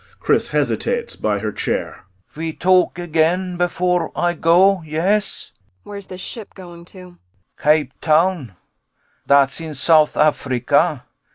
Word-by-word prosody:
CHRIS - - +1
hesitates 475 -1 -1
by 105 -1 -1
her 105 +1 -3
chair.] - - -4 0.3
Ve 160 +1 -5
talk 185 0 +2
again 175 +2 0
before 175 -1 -1
Ay 175 0 0
go, 180 +4 +3
yes? 180 +7 -1
ANNA - - -43
[Dully.] 95 -1 -43
Where's 200 -1 -7
this 185 0 -9
ship 220 +1 -6
going 175 -2 -12
to? 180 -1 -14 0.4
CHRIS - - -21
Cape 150 -3 +1
Town. 155 - +1 0.7
Dat's 140 +2 +3
in 160 -2 -7
South 155 +2 +3
Africa. 130 -5 +1
170 Hz, 135 wpm, -19 LUFS, 150-185 Hz, 0.7 s, go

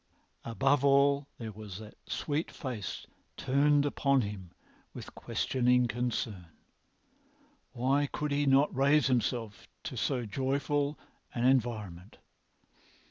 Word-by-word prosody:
Above 135 +4 +1
all, 140 0 +4
there 115 -2 -6
was 105 -3 -9
that 110 0 -10
sweet 150 +2 -2
face 120 - -6 0.3
turned 145 +2 +3
upon 140 -2 +2
him 100 -4 -6 0.5
with - - -9
questioning 125 -1 +1
concern. 115 -6 -3 1.3
Why 135 +4 +1
could 150 +1 -3
he 145 0 +1
not 135 +1 +4
raise 140 +3 +4
himself 115 -3 -1 0.2
to - - -5
so 125 +1 -1
joyful 140 +5 -1 0.4
an 120 0 0
environment? 110 -8 0
130 Hz, 110 wpm, -30 LUFS, 110-140 Hz, 1.3 s, all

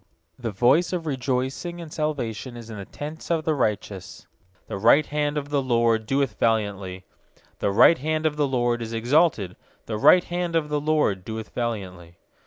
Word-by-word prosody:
15The 115 -2 -2
voice 130 - +3
of 175 -2 -2
rejoicing 135 +5 -2
and 165 -3 -9
salvation 130 -5 -3
is 115 -1 -10
in 105 - -7
the 100 - -7
tents 150 +8 -8
of 165 -2 0
the 160 - +2
righteous; 100 -7 -3 0.4
The 100 - -5
right 140 +8 +5
hand 150 0 -1
of 145 -1 -3
the 145 -1 +1
LORD 115 -3 +1
doeth 135 -4 0
valiantly. 100 -5 -1 0.5
16The 100 - 0
right 165 +9 +7
hand 155 +2 -1
of 155 -1 +1
the 150 -1 +1
LORD 120 -2 0
is 115 0 -5
exalted; 120 - +2 0.3
The 110 -2 -4
right 180 +10 +7
hand 175 -1 -3
of 155 -2 +1
the 150 -1 -1
LORD 150 -11 +1
doeth 110 +2 -7
valiantly. 95 -8 -5
125 Hz, 180 wpm, -24 LUFS, 110-150 Hz, 0.5 s, right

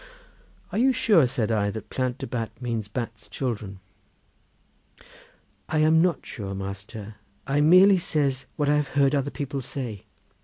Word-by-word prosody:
"Are 210 - -1
you 265 +2 +5
sure?" 210 - +4
said 115 -2 -1
I, 105 -2 +1
"that 110 +2 -7
Plant 130 -1 -1
de - - -5
Bat 115 -1 -5
means 115 -4 -3
Bat's 115 0 -6
children?" 105 -7 -4 1.9
"I 155 - 0
am 155 +1 +5
not 175 -4 +1
sure, 100 -4 -6
master; 100 +2 -7 0.3
I 140 +2 +1
merely 185 +5 +7
says 140 -7 -1
what 145 - 0
I 150 +1 +4
have 150 -1 0
heard 140 0 +4
other 140 -1 +1
people 140 -2 -4
say. 120 -6 -6
130 Hz, 155 wpm, -25 LUFS, 110-150 Hz, 1.9 s, merely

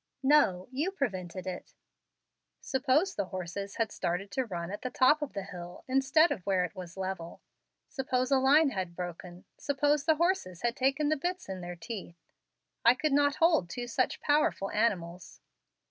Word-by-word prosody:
"No; 265 -11 +4
you 290 +8 -1
prevented 190 - -4
it." 185 -1 -7 0.8
"Suppose 280 +8 +1
the 200 - -2
horses 185 +2 -5
had 225 -2 -1
started 190 +3 -3
to 260 - -1
run 175 -3 -4
at 205 - -6
the 255 - -3
top 275 +5 +4
of 295 - -4
the 200 - -4
hill 175 -2 -9
instead 270 +5 +4
of 185 - -3
where 185 -2 +1
it 175 - -8
was 180 -1 -9
level; 185 -3 -5 0.5
suppose 255 -2 -1
a 270 - +5
line 280 +3 +5
had 185 -5 -4
broken; 175 0 -7
suppose 290 +1 +1
the 315 -1 +4
horses 325 - 0
had 240 0 +1
taken 275 +3 +1
the 310 - +2
bits 360 +5 -3
in 190 -1 -5
their 175 0 -6
teeth, 175 -1 -7 0.7
I 235 +2 +6
could 305 +2 0
not 285 0 +3
hold 320 - +3
two 245 +6 -4
such 245 +2 -1
powerful 290 -9 +1
animals. 180 -6 -1
235 Hz, 175 wpm, -30 LUFS, 185-285 Hz, 0.8 s, I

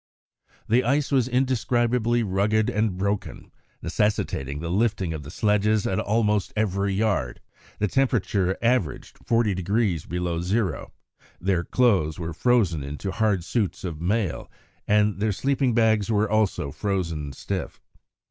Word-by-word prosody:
The 120 +4 +3
ice 140 +4 +1
was 130 -3 +3
indescribably 120 -2 +1
rugged 105 +2 +1
and 105 -3 0
broken, 100 +1 -3 0.3
necessitating 75 -9 -1
the 85 +1 -4
lifting 100 -4 0
of 80 - -5
the 70 - -10
sledges 105 +3 +1
at 95 - 0
almost 105 -2 +1
every 100 -2 0
yard; 95 - 0 0.4
the 105 - +1
temperature 100 -7 +1
averaged 115 -9 0
40° 100 -5 0
below 85 -1 -2
zero; 95 -1 -1 0.5
their 90 0 0
clothes 95 -10 +2
were 85 -1 -4
frozen 100 - +2
into 75 +8 -5
hard 100 -3 +1
suits 105 +1 -2
of 85 -4 -5
mail, 95 -1 -1 0.4
and 105 -1 +2
their 105 +1 +1
sleeping 135 +2 0
bags 110 -2 +3
were 110 -1 +2
also 105 -9 0
frozen 85 -5 -2
stiff. 65 - -5
105 Hz, 130 wpm, -25 LUFS, 90-115 Hz, 0.5 s, The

